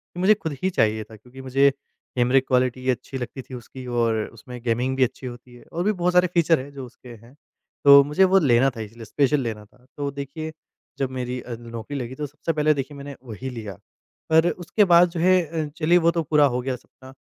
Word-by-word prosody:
कि - - -6
मुझे 190 +4 +5
खुद 160 -8 -5
ही 190 - +3
चाहिए 110 - +1
था 110 - -14
क्योंकि 125 +5 -13
मुझे 135 +2 +3 0.5
कैमरे 125 +2 +4
की 130 - -9
क्वालिटी 130 0 +1
अच्छी 130 +2 -2
लगती 130 +2 -6
थी 130 - -14
उसकी 125 +2 -10
और 115 -2 +1 0.2
उसमें 125 +2 -10
गेमिंग 125 +2 0
भी 130 - +4
अच्छी 130 +1 -3
होती 120 0 -11
है। 120 - -15
और 170 - -2
भी 210 - +2
बहुत 180 -3 0
सारे 180 0 +5
फ़ीचर 165 -3 +3
है 140 +2 -8
जो 135 -2 -8
उसके 125 0 -15
हैं। 120 - -17 0.5
तो 140 0 +9
मुझे 150 +7 +2
वो 190 +1 +5
लेना 135 -4 +4
था 115 - -5
इसलिए, 115 +2 -9
स्पेशल 145 +4 +1
लेना 110 -4 -5
था। 125 +4 -27
तो 145 -1 -2
देखिए 140 +3 -6 0.5
जब 135 -2 0
मेरी 125 -1 -4
अ, 120 - -7
नौकरी 115 +4 -7
लगी 125 +1 -6
तो 150 - -4
सबसे 150 +3 -4
पहले 155 0 +3
देखिए 140 +1 -5
मैंने 140 0 -8
वही 125 +2 -7
लिया। 110 -5 -7 0.6
पर 160 +2 +5
उसके 180 +4 +1
बाद 175 0 +7
जो 170 - -5
है 165 -3 +2
चलिए 170 +2 +4
वो 170 -1 +3
तो 170 - -1
पूरा 150 0 +4
हो 125 - -1
गया 130 0 -2
सपना 130 +1 -16
135 Hz, 230 wpm, -23 LUFS, 125-155 Hz, 0.6 s, तो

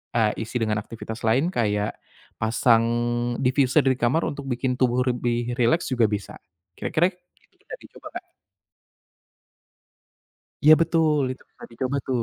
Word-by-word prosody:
eee, 110 -1 +1
isi 120 - -3
dengan 110 -1 0
aktivitas 110 +1 -8
lain 130 +10 +2
kayak 105 -2 -1 0.4
pasang 115 +1 +3 0.6
diffuser 135 +2 +3
di 130 -1 +2
kamar 125 +8 +2
untuk 140 -1 -7
bikin 125 0 -1
tubuh 125 -1 +2
lebih 120 -1 -1
rileks 160 +9 +2
juga 120 -3 +3
bisa 105 -1 -5 0.4
kira-kira 175 +4 +1
itu 180 0 -34
bisa - - -9
dicoba - - -13
Kak. - - -8 2.4
Iya 155 - +9
betul, 165 -2 +2
itu 130 - -13
bisa - - -14
dicoba 130 +4 -3
tuh. 125 -3 0
125 Hz, 135 wpm, -24 LUFS, 115-140 Hz, 2.4 s, Iya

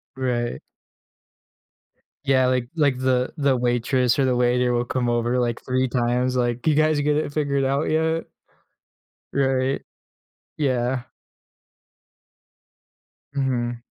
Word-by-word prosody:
Right. 120 -2 -2 1.7
Yeah, 130 -2 +3
like 125 -1 0
like 140 -5 +2
the 130 -1 +1
the 140 -4 +2
waitress 125 +1 +1
or 140 - +3
the 130 -1 +2
waiter 125 0 +2
will 120 0 0
come 125 -1 -1
over 120 +1 +1
like 120 -1 -1
3 130 0 0
times, 125 +1 0
like, 120 +1 -1
"You 155 - +4
guys 155 0 +3
get 150 0 +1
it 145 -2 -2
figured 140 -3 0
out 140 +3 0
yet?" 160 +1 +1 1.1
Right. 135 -1 +1 0.7
Yeah. 130 -3 0 2.3
Mhm. 120 -3 -1
130 Hz, 115 wpm, -23 LUFS, 120-140 Hz, 2.3 s, You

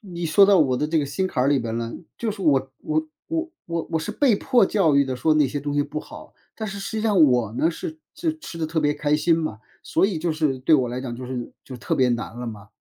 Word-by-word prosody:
你 175 -4 -6
说 195 +5 +6
到 200 -1 +5
我 130 -4 +2
的 150 - 0
这 160 +2 -1
个 150 - +1
心 185 +7 -1
坎 125 - -1
儿 135 - +2
里 145 -1 +3
边 115 -2 -3
了。 115 0 -3 0.2
就 230 - -2
是 205 -1 -7
我 135 -6 +2
我 315 0 0 0.2
我 325 - -4
我 160 - +1
是 155 - -4
被 260 -8 +3
迫 245 0 +3
教 185 -7 +2
育 140 0 +5
的， 130 -1 -3
说 155 +5 +2
那 150 -2 +4
些 145 - -3
东 145 0 -3
西 145 - +3
不 145 +1 -5
好， - - -11 0.2
但 220 - -5
是 195 +1 -6
实 200 +3 -5
际 - - -2
上 210 -5 +3
我 125 -6 +2
呢， 160 - +2
是 315 - -7 0.2
是 320 -2 -2
吃 310 - -9
得 160 - -1
特 160 +1 -2
别 150 -1 +2
开 150 0 +1
心 165 +2 +3
嘛， 155 -10 -3 0.2
所 - - +2
以 190 -6 -2
就 165 +1 -1
是 155 -4 0
对 135 - +2
我 130 -4 +2
来 125 +1 -4
讲 125 -2 -5
就 125 +1 -7
是 125 -2 -5
就 130 - -8
特 - - -2
别 130 -2 +3
难 120 0 -3
了 120 - -5
嘛。 105 -3 -8
155 Hz, 300 characters per minute, -23 LUFS, 130-195 Hz, 0.2 s, 说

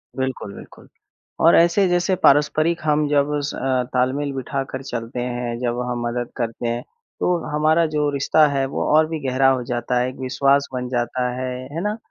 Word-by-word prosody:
बिल्कुल, 130 -6 -3
बिल्कुल। - - -13 0.6
और 170 - +7
ऐसे 170 +3 +4
जैसे 175 +2 +1
पारस्परिक 155 +3 +3
हम 150 -1 +2
जब 145 0 +2
स - - -4
अ, 130 -1 0
तालमेल 135 +3 0
बिठाकर 135 0 -4
चलते 120 -1 -5
हैं, 120 -1 -3
जब 120 -1 -2
हम 120 -1 -2
मदद 120 0 -3
करते 120 0 -3
हैं 120 +1 -2 0.4
तो 180 -1 +2
हमारा 155 +2 +3
जो 150 -1 +2
रिश्ता 145 +2 +3
है 135 -1 0
वो - - -1
और 155 0 +5
भी 160 -1 -3
गहरा 130 +1 +3
हो 130 -2 +1
जाता 120 +1 -1
है, 125 +1 0
एक 130 - -10
विश्वास 140 +2 +2
बन 125 0 -3
जाता 125 0 -1
है, 130 0 -3 0.2
है 165 - -3
ना। 210 +1 -1
135 Hz, 190 wpm, -21 LUFS, 125-150 Hz, 0.6 s, और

